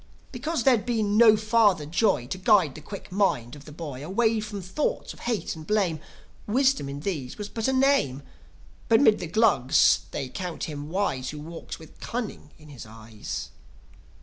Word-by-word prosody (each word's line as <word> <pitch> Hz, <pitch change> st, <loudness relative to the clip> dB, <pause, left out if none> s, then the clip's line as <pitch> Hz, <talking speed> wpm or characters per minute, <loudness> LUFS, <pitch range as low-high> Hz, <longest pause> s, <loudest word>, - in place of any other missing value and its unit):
Because 275 Hz, +2 st, -2 dB
there'd 245 Hz, -5 st, +4 dB
been 220 Hz, -4 st, 0 dB
no 220 Hz, -1 st, +7 dB
father 215 Hz, -7 st, +3 dB
Joi 170 Hz, -, +1 dB
To 185 Hz, +9 st, -5 dB
guide 190 Hz, -, +4 dB
the 155 Hz, -, -10 dB
quick 200 Hz, +4 st, -9 dB
mind 180 Hz, -, 0 dB
of 145 Hz, +1 st, -14 dB
a -, -, -9 dB
boy 145 Hz, -4 st, -7 dB
Away 220 Hz, +6 st, +1 dB
from 210 Hz, -1 st, -5 dB
thoughts 245 Hz, -, -3 dB
of -, -, -17 dB
hate 235 Hz, -7 st, -2 dB
and 155 Hz, -1 st, -11 dB
blame, 195 Hz, -7 st, +1 dB, 0.5 s
Wisdom 260 Hz, -, +2 dB
in 140 Hz, +1 st, -6 dB
these 145 Hz, -9 st, -4 dB
was 210 Hz, -1 st, -6 dB
but 225 Hz, +1 st, -2 dB
a -, -, +2 dB
name. 260 Hz, -, +2 dB, 0.7 s
But 225 Hz, -, +6 dB
'mid 220 Hz, -7 st, +5 dB
the 175 Hz, -, -4 dB
Glugs 145 Hz, -, +4 dB
they 135 Hz, -, -4 dB
count 175 Hz, +4 st, -5 dB
him 145 Hz, -1 st, -5 dB
wise 160 Hz, -9 st, -1 dB
Who 150 Hz, -, -7 dB
walks 165 Hz, +3 st, -8 dB
with 160 Hz, -, -16 dB
cunning 230 Hz, -10 st, -5 dB
in 155 Hz, -1 st, -16 dB
his 130 Hz, -6 st, -10 dB
eyes. 110 Hz, -1 st, -7 dB
190 Hz, 180 wpm, -26 LUFS, 145-225 Hz, 0.7 s, no